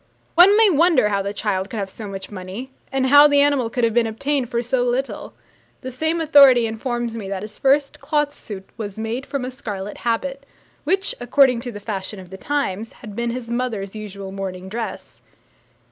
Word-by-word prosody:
One 380 +5 +7
may 445 -1 +7
wonder 325 -8 +4
how 200 -1 0
the 200 +1 -3
child 200 -2 -2
could 225 - -6
have 200 -2 -2
so 210 +2 -9
much 195 0 -7
money, 195 +7 -7 0.2
and 270 -1 +1
how 290 +2 +8
the 285 -1 +4
animal 280 -5 +2
could 245 +1 -2
have 230 -1 +2
been 235 -1 +3
obtained 270 +3 -1
for 235 0 -1
so 250 +1 0
little. 250 +2 -2 0.5
The 260 - -6
same 315 +6 -1
authority 280 -6 +6
informs 235 +1 -3
me 205 -4 -6
that 195 0 -4
his 210 0 -9
first 275 +1 +2
cloth 295 0 0
suit 195 -7 -9
was 205 -3 -6
made 225 +5 -4
from 275 -3 -3
a 255 - -5
scarlet 205 -5 -6
habit, 270 +4 -2 0.4
which, 380 +5 +1
according 250 0 +3
to 245 - -5
the 205 - -8
fashion 200 -1 -5
of 185 -1 -12
the 190 - -8
times, 225 -5 -2
had 210 -2 -11
been 235 +1 -1
his 235 -1 -5
mother's 230 -6 -2
usual 200 -2 -7
morning 190 -1 -6
dress. 225 +2 -6
235 Hz, 200 wpm, -21 LUFS, 205-275 Hz, 0.5 s, how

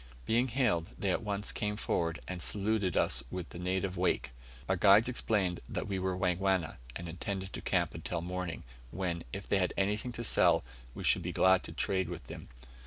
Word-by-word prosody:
Being 120 - +3
hailed, 115 -10 +1
they 100 - 0
at - - 0
once 100 -1 -2
came 105 -1 -2
forward, 85 -5 -1
and 90 -2 -4
saluted 105 -2 0
us - - +3
with 90 -2 -5
the 85 - -9
native 95 +1 -1
"Wake." 90 -6 +1 0.4
Our 95 - +2
guides 100 +5 +6
explained 105 -7 0
that - - -3
we 95 -1 -1
were 95 0 -1
Wangwana, 90 -1 +1 0.2
and 85 - -5
intended 95 +3 -4
to - - -5
camp 85 -3 +1
until 85 +1 -3
morning, 90 -1 -4 0.3
when, 85 +1 -2
if 100 0 -6
they 100 - +3
had 90 - 0
anything 105 +5 0
to 120 - -5
sell, - - +4 0.3
we - - -6
should - - +4
be - - -3
glad 95 0 +5
to - - -6
trade 95 -3 0
with 85 -2 -6
them. - - -9
95 Hz, 195 wpm, -32 LUFS, 90-100 Hz, 0.4 s, guides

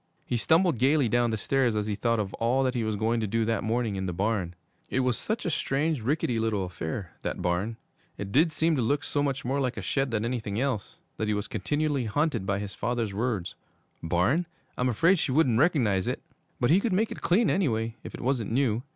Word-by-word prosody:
He - - -2
stumbled 160 - +3
gayly 135 +1 +3
down 120 +2 +2
the 110 - -1
stairs 125 +1 +1
as 105 -1 0
he 105 - -1
thought 115 +2 0
of 100 -2 -3
all 125 +4 +1
that 130 -1 +1
he 120 -3 -1
was 110 -1 -1
going 110 +3 +1
to 110 - -1
do 115 +2 0
that 115 -1 0
morning 115 -1 0
in 95 0 -2
the - - -1
barn. 95 -2 -1 0.3
It 130 - +1
was 125 -2 +1
such 220 - -2
a 170 - 0
strange, 145 0 0
rickety 125 -1 0
little 110 -4 0
affair, 85 0 -5
that - - -4
barn; 95 +6 -1 0.4
it 100 -1 -5
did 155 - +4
seem 160 +1 +1
to 130 - 0
look 140 +5 +1
so 145 0 -1
much 135 -3 -1
more 135 +3 0
like 130 -3 -1
a - - -3
shed 135 -1 0
than 115 -1 -1
anything 115 -4 -2
else, 130 -6 -2 0.2
that 110 - -1
he 105 - +1
was 105 0 -3
continually 145 +6 -1
haunted 115 -3 0
by 100 - +1
his 100 -1 -5
father's 115 -2 -2
words: 105 -4 -2 0.5
'Barn? 90 - +1 0.3
I'm 125 +1 +1
afraid 165 - +3
she 140 - 0
wouldn't 130 -5 +3
recognize 120 - +2
it.' - - -2 0.4
But 120 - +2
he 180 - +6
could 210 -1 0
make 215 +4 +1
it - - -7
clean, 205 +7 +3
anyway, 115 - 0
if - - -7
it - - -8
wasn't 120 -4 0
new. 120 -3 +1
120 Hz, 230 wpm, -27 LUFS, 105-140 Hz, 0.5 s, he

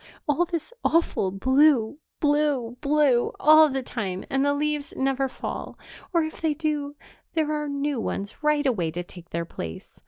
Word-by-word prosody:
All 300 +4 +2
this 335 +5 -5
awful 330 - +2
blue, 260 +5 +3 0.2
blue, 290 -5 +1
blue, 285 -4 +3
all 310 0 +7
the 270 -1 -2
time, 195 -7 -4
and 270 0 +2
the 285 - +3
leaves 295 0 -2
never 270 0 +1
fall, 260 - -6 0.3
or, 335 -3 +3
if 315 - -6
they 315 -2 +1
do, 295 -2 -2 0.4
there 310 -2 +1
are 300 -1 -2
new 280 -2 -1
ones 200 +1 -4
right 300 -1 +2
away 200 -11 +1
to 175 +3 -4
take 175 -1 -14
their 170 0 -3
place. 80 - -8
285 Hz, 165 wpm, -25 LUFS, 235-300 Hz, 0.4 s, all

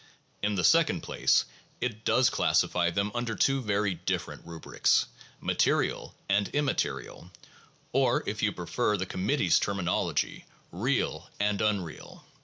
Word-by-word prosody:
In 105 0 0
the 90 - 0
second 165 - +4
place, - - +2 0.3
it 115 -3 -3
does 125 +1 +3
classify 85 -1 +2
them 100 +4 -1
under 120 -2 -2
two 135 0 +2
very 105 -3 0
different 85 - -4
rubrics 85 -1 +1 0.3
'material' - - 0
and 100 +1 +2
'im 145 0 +2
material,' 135 - -3 0.6
or, - - +2
if - - -3
you - - +2
prefer 105 - -1
the 95 - -2
Committee's 95 - +1
terminology, 95 -3 -1 0.3
'real' - - -1
and 105 -1 +1
'unreal.' 100 -7 -3
105 Hz, 130 wpm, -28 LUFS, 95-120 Hz, 0.6 s, second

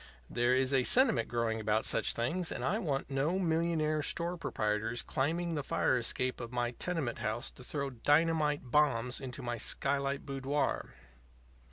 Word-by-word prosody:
There 120 +1 +2
is 130 +1 +1
a 130 -2 +4
sentiment 255 - +4
growing 115 -2 -1
about 110 0 +1
such - - +2
things, 165 +9 -1
and - - -3
I 210 - +1
want 140 -8 -2
no 145 +7 +1
millionaire 160 -3 +1
store 170 +4 -1
proprietors 110 -6 -1
climbing 165 +5 -1
the 150 - -1
fire 130 - +1
escape 125 +1 -1
of 120 0 -6
my 120 -1 -1
tenement 145 -4 -3
house 110 +2 -2
to 125 - -10
throw 140 +1 -2
dynamite 150 +3 +2
bombs 130 -4 +2
into 130 0 -7
my 120 -1 -2
skylight 140 +4 0
boudoir. 140 +1 -2
135 Hz, 160 wpm, -32 LUFS, 120-160 Hz, -, a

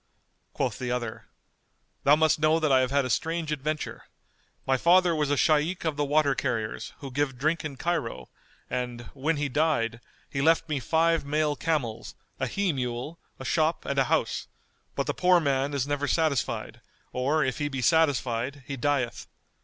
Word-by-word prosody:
Quoth - - -2
the 125 - -3
other, 120 -2 -3 0.8
"Thou 145 +2 +7
must 155 0 +3
know 155 +1 +3
that 155 -3 +1
I 130 - +6
have 130 -1 +1
had 140 0 +2
a - - -3
strange 165 +6 -1
adventure. 150 +1 -3 0.6
My 135 - +3
father 175 +4 +4
was 150 -2 0
a 145 - +2
Shaykh 160 +5 +2
of 160 -2 0
the 145 - 0
Water 145 0 +3
carriers 115 -5 -3
who 135 -2 -7
give 135 -1 -1
drink 155 +6 0
in 150 -3 -5
Cairo 115 - -2 0.4
and, 125 -1 -3
when 150 +3 -1
he 145 0 0
died, 125 -5 0 0.3
he 135 - -3
left 165 +2 +3
me 150 -3 -1
five 165 +7 +2
male 150 +1 0
camels, 135 -9 -2 0.2
a - - 0
he 200 -4 0
mule, 125 +4 -4 0.2
a 130 - -8
shop 155 +6 +1
and 140 0 0
a 135 - +4
house; - - 0 0.5
but - - -1
the - - -1
poor 180 -1 +4
man 140 -2 0
is 140 -2 -1
never 145 0 -1
satisfied; 155 -4 -1 0.3
or, 140 +5 +1
if 130 +2 -2
he 145 - 0
be 135 -3 -3
satisfied 140 -3 +1
he 140 - -4
dieth. 135 -2 -1
145 Hz, 180 wpm, -27 LUFS, 130-155 Hz, 0.8 s, Thou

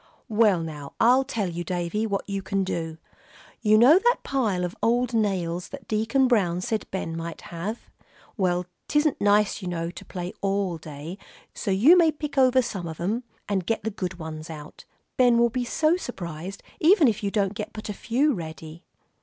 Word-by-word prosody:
"Well 210 -5 +4
now, 150 -3 -7
I'll 250 +3 +5
tell 230 -7 -2
you, 175 0 -4
Davie, 180 +5 -2
what 200 -2 -2
you 195 -1 -3
can 195 0 -1
do. 165 -3 -3 0.6
You 215 -1 +5
know 270 +10 +7
that 480 +4 +2
pile 210 -10 0
of 175 - -6
old 240 +1 +2
nails 180 -5 0
that 280 - -10
Deacon 225 +5 +2
Brown 185 -8 +2
said 220 +3 -2
Ben 165 -4 -4
might 165 0 -6
have? 190 +7 -5 0.5
Well, 180 -3 0 0.2
'tisn't 295 0 +1
nice, 205 +1 +3
you 185 - -5
know, 170 -1 -3
to - - -10
play 180 -1 -6
all 195 -3 0
day, 155 +5 -8 0.3
so - - -4
you 220 - +6
may 335 -3 +5
pick 300 -1 -6
over 260 -1 +5
some 190 -7 -4
of 160 -1 -7
'em, 220 +8 -1 0.2
and 190 -4 -1
get 225 - 0
the 220 - -2
good 185 -3 -4
ones 160 -1 -7
out. 150 -1 -10 0.3
Ben 245 -2 +5
will 235 0 +4
be 250 +1 -1
so 315 +7 +2
surprised, 185 - -7 0.2
even 330 -2 +6
if 220 -4 0
you 200 - 0
don't 200 -2 0
get 210 0 -5
but 215 -1 -7
a 210 - -3
few 265 +8 +1
ready." 160 -2 -8
200 Hz, 190 wpm, -25 LUFS, 175-235 Hz, 0.6 s, know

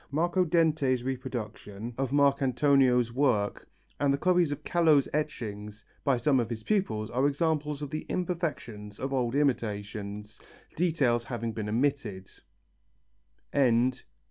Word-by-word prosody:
Marco 175 +5 +1
Dente's 155 -7 +2
reproduction 120 -4 -5
of 135 0 -1
Marcantonio's 135 -3 +3
work 120 -7 0 0.3
and 145 -1 +3
the 140 - +1
copies 175 -1 +2
of 145 - -5
Callot's 160 -5 +3
etchings 105 -8 -4 0.2
by 135 -3 +2
some 135 +1 +2
of 115 - -1
his 110 -2 -5
pupils 115 - -1
are 130 +4 +2
examples 150 0 -1
of 140 - -6
the 155 - -4
imperfections 150 - -3
of 135 +1 -3
old 125 -1 0
imitations, 105 -6 -2 0.4
details 140 -9 +1
having 115 -1 -3
been 110 -1 -4
omitted. 110 -6 -1
135 Hz, 120 wpm, -29 LUFS, 115-150 Hz, 0.4 s, Marcantonio's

